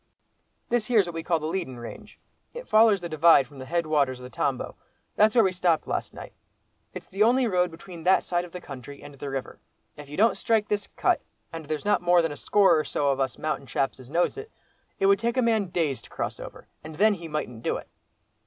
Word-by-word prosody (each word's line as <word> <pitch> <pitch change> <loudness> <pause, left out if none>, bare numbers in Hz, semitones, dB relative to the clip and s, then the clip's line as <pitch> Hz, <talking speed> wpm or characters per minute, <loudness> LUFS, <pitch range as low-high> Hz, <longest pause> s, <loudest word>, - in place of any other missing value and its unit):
"This 235 -2 0
here's 220 -6 +4
what 175 - -6
we 165 - -4
call 165 0 +1
the 155 - -6
leadin' 160 -6 -3
range; 165 - -10 0.4
it - - -8
follers 215 -3 +5
the 175 - -4
divide 160 -3 +5
from 135 +1 -15
the 130 - -8
head 170 +2 0
waters 140 -5 +1
of - - -12
the 125 - -9
Tambo; - - -2 0.4
that's 215 +2 +4
where 230 - +6
we 190 - +2
stopped 175 -3 +1
last - - -3
night. - - -10 0.6
It's - - -8
the 195 - -5
only 245 +4 +4
road 180 -5 +1
between 170 +1 -11
that 185 +2 +4
side 175 0 -1
of 175 - -11
the 180 - -7
country 140 -2 -10
and 145 - -11
the 140 +1 -7
river. 135 -1 -5 0.4
If 145 -1 -11
you 150 - -8
don't 225 +4 +4
strike 220 -2 +1
this 205 -1 -1
'cut,' - - 0 0.3
and 165 -2 -7
there's 155 +2 -3
not 205 - +2
more 175 -1 +4
than 165 - -1
a - - -6
score 195 0 +3
or - - 0
so 145 -1 -1
of 135 -1 0
us 130 -2 -1
mountain 155 -3 -3
chaps 135 +2 -1
as 130 -1 -13
knows 175 - 0
it, 430 +1 -7 0.5
it 195 - 0
would 195 0 +5
take 235 +2 -1
a - - +4
man 220 -3 +2
days 160 -6 -1
to - - -15
cross - - -4
over, - - -10 0.2
and 155 0 -9
then 210 +5 +4
he 170 -4 -7
mightn't 150 -7 -4
do - - -1
it." - - -10
170 Hz, 245 wpm, -26 LUFS, 145-205 Hz, 0.6 s, where